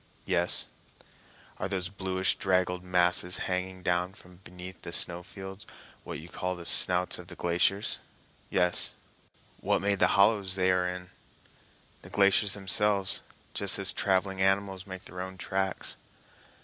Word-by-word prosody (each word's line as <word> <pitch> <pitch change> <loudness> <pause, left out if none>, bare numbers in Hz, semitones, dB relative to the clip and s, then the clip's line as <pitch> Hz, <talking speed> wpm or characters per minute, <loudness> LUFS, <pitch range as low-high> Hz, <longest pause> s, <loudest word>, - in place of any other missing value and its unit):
"Yes." 90 -2 +1 0.9
"Are 95 - -3
those 95 -2 -2
bluish 95 -1 0
draggled 90 -1 0
masses 90 0 +3
hanging 95 0 -3
down 90 +2 0
from 90 0 -16
beneath 90 0 -10
the - - -7
snow 85 +1 +2
fields 95 +1 -10 0.4
what - - -6
you 80 - -10
call 90 +1 -3
the 85 -1 -10
snouts 90 +1 +2
of 90 - -11
the - - -10
glaciers?" 90 +4 +1 0.5
"Yes." 90 -1 +2 0.6
"What - - +1
made 100 -1 0
the - - +5
hollows 100 -2 +3
they 95 -1 +2
are 90 0 +1
in?" 90 0 -6 0.9
"The - - -12
glaciers 100 0 +4
themselves, 100 -1 +2 0.3
just - - +3
as - - 0
traveling 95 0 0
animals 95 0 0
make 95 -1 -8
their 90 - -7
own 95 0 -7
tracks." 95 0 0
95 Hz, 145 wpm, -29 LUFS, 90-95 Hz, 0.9 s, the